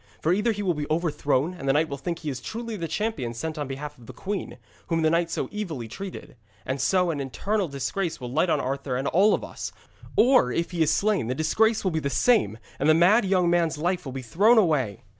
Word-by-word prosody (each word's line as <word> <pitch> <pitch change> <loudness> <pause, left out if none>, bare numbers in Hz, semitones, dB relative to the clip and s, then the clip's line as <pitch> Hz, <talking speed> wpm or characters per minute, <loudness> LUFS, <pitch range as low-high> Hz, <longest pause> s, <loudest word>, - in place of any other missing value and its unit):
For 165 - +2
either 210 +5 +2
he 205 -1 -3
will 180 -3 +1
be 150 -2 -4
overthrown, 155 -1 0
and 140 -6 -4
the - - +5
knight 155 +3 +2
will 140 - -4
think 170 +4 -3
he 155 -3 -4
is 130 -1 -6
truly 230 - -5
the 170 -5 -4
champion 155 - -2
sent 155 +6 -4
on 145 - -3
behalf 145 +2 -7
of 115 - -16
the - - -9
queen, 195 -10 -5 0.3
whom 165 -1 0
the 155 - +3
knight 170 0 +1
so - - -2
evilly 165 - -4
treated, 190 - -8 0.3
and 130 +1 -2
so 180 +2 +2
an 150 - -4
eternal 195 - -1
disgrace 150 +6 -3
will 125 -2 -6
light 160 +6 +2
on 155 - +2
Arthur 135 -1 -2
and 135 - -2
all 200 +5 +4
of - - -6
us; - - -6 0.4
or, 245 - +5
if 170 +8 -1
he 175 -2 -2
is 155 -1 +4
slain, 200 - +1
the 125 - -1
disgrace 220 - +2
will 190 - +1
be 160 - 0
the 140 -2 -2
same, 140 - +2 0.2
and 145 - +2
the 155 - +6
mad 200 +7 +5
young 185 -2 +2
man's 170 -3 +2
life 175 +3 -1
will 135 - -6
be 130 0 -6
thrown 205 - +4
away.' 145 - +2
160 Hz, 245 wpm, -25 LUFS, 140-190 Hz, 0.4 s, the